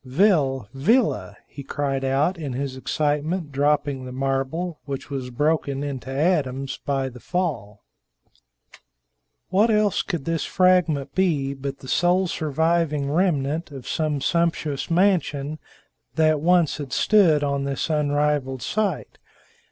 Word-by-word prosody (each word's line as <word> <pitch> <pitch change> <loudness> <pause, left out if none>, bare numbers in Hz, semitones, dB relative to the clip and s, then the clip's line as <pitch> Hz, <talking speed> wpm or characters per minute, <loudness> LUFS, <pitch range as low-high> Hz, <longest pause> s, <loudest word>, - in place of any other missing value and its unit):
"Vil 135 - +2
Villa!" 135 - +1
he 145 - -9
cried 135 -1 -2
out, 135 +7 +1
in 150 -7 -5
his 135 +1 -3
excitement 150 +4 -1
dropping 145 -1 0
the 130 - -7
marble, 135 +6 -2
which 140 0 -6
was 130 -2 -4
broken 145 +1 0
into 135 -3 -5
atoms 135 -3 0
by 135 -2 0
the 125 -1 -10
fall. 135 - -3 1.7
What 205 +5 +3
else 210 -2 +2
could 170 -8 -4
this 165 -3 -1
fragment 175 -7 +2
be 150 -8 +1
but 135 0 -5
the 130 - -12
sole 180 +6 +2
surviving 160 -2 0
remnant 160 -2 0
of 135 -4 -10
some 150 -3 -1
sumptuous 165 -3 0
mansion 160 -5 +1 0.6
that 155 -1 +3
once 175 -1 +3
had 145 -4 -7
stood 160 0 +4
on 140 -1 -1
this 140 -1 -2
unrivaled 145 -3 0
site? 205 -6 -2
145 Hz, 130 wpm, -23 LUFS, 135-170 Hz, 1.7 s, stood